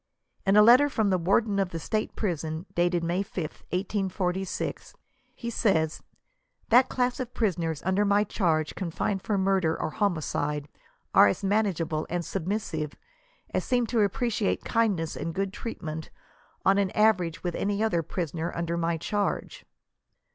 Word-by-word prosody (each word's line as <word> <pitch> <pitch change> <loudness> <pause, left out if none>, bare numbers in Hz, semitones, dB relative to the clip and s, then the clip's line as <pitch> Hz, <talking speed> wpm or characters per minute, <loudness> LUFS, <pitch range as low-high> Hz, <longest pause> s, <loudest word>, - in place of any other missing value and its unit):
In 195 - +5
a 210 - +9
letter, 250 +6 +7
from 220 -7 +1
the 185 - +2
Warden 200 +4 +2
of 195 -2 +1
the 165 - -5
State 215 +7 -2
prison, 160 -4 -2
dated 175 0 +1
May 175 +3 0
5th, 170 -5 -6
1846, 190 - -2 0.4
he 235 -1 -5
says, 160 -9 +1 0.7
"that 250 +3 +6
class 250 0 0
of 250 -1 -5
pri 220 -3 +3
soners 165 -4 -3
under 190 +2 +2
my 205 0 +3
charge, 165 -7 0
confined 190 +2 -2
for 205 +1 -1
murder 190 -4 +1
or 155 - -2
homicide, 150 -6 -1 0.5
are - - +8
as 100 - -1
manageable 185 -6 0
and 175 0 -2
submissive, 170 -5 -3 0.6
and - - 0
s^em 245 -2 +1
to 235 - +1
appreciate 210 +1 0
kindness 205 -9 +1
and 165 0 -4
good 195 0 -1
treatment, 160 -10 -6 0.6
on 195 +1 +5
an 195 -2 +2
average 185 -6 +2
with 175 -1 -1
any 205 +4 -1
other 195 -7 +2
prisoners 165 0 -3
under 170 0 -2
my 165 0 0
charge." 205 +5 -2
190 Hz, 155 wpm, -27 LUFS, 165-210 Hz, 0.7 s, a